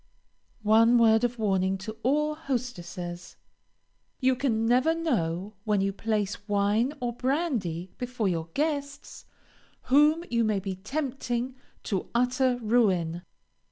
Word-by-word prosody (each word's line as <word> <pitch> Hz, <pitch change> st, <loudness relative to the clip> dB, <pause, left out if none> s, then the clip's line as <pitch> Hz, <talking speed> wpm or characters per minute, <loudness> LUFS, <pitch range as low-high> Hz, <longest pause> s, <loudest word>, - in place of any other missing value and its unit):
One 225 Hz, +3 st, +5 dB
word 225 Hz, -1 st, +5 dB
of 245 Hz, 0 st, 0 dB
warning 195 Hz, -3 st, +1 dB
to 220 Hz, +3 st, -7 dB
all 300 Hz, +5 st, +1 dB
hostesses. 180 Hz, -, -5 dB, 0.8 s
You 260 Hz, -1 st, +3 dB
can 230 Hz, -4 st, 0 dB
never 255 Hz, +8 st, +3 dB
know, 205 Hz, -, -1 dB
when 210 Hz, -2 st, +1 dB
you 195 Hz, 0 st, 0 dB
place 210 Hz, -1 st, -2 dB
wine 205 Hz, +7 st, +1 dB
or 245 Hz, -1 st, -2 dB
brandy 240 Hz, -, -1 dB
before 245 Hz, -4 st, -2 dB
your 165 Hz, -2 st, -2 dB
guests, 285 Hz, -2 st, -3 dB, 0.7 s
whom 300 Hz, +4 st, +5 dB
you 235 Hz, -1 st, +2 dB
may 215 Hz, -2 st, +1 dB
be 195 Hz, 0 st, -4 dB
tempting 255 Hz, +2 st, -3 dB, 0.3 s
to 195 Hz, -3 st, -3 dB
utter 250 Hz, +1 st, +2 dB
ruin. 185 Hz, -7 st, +2 dB
230 Hz, 120 wpm, -27 LUFS, 195-260 Hz, 0.8 s, One